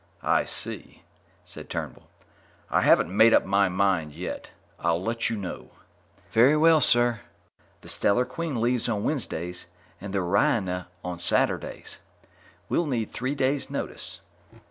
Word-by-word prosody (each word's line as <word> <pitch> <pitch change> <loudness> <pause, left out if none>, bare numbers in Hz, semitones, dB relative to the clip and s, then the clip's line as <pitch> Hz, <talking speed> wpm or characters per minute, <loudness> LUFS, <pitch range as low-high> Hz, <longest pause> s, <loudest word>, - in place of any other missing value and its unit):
"I - - +2
see," - - -4 0.4
said 90 - -11
Turnbull. - - -6 0.6
"I - - +3
haven't 90 - +4
made 115 +2 +7
up - - +3
my 100 0 +3
mind 90 -5 +1
yet. 90 +3 -6 0.3
I'll 85 -1 +1
let 115 +2 -1
you 115 - -2
know." 95 -3 -6 0.6
"Very 130 +7 +5
well, 160 0 +5
sir. 120 -2 +3 0.6
The - - -14
Stellar 120 +5 +1
Queen 150 -1 -4
leaves 120 +1 +1
on 105 -3 -1
Wednesdays 90 - -3 0.3
and 100 0 -6
the 100 - -1
Oriona 90 0 +1 0.2
on 90 -1 -5
Saturdays. 85 - -1 0.7
We'll 170 - 0
need 115 -6 -2
three 130 +4 -3
days' 135 0 0
notice." - - -6
110 Hz, 140 wpm, -26 LUFS, 90-125 Hz, 0.7 s, made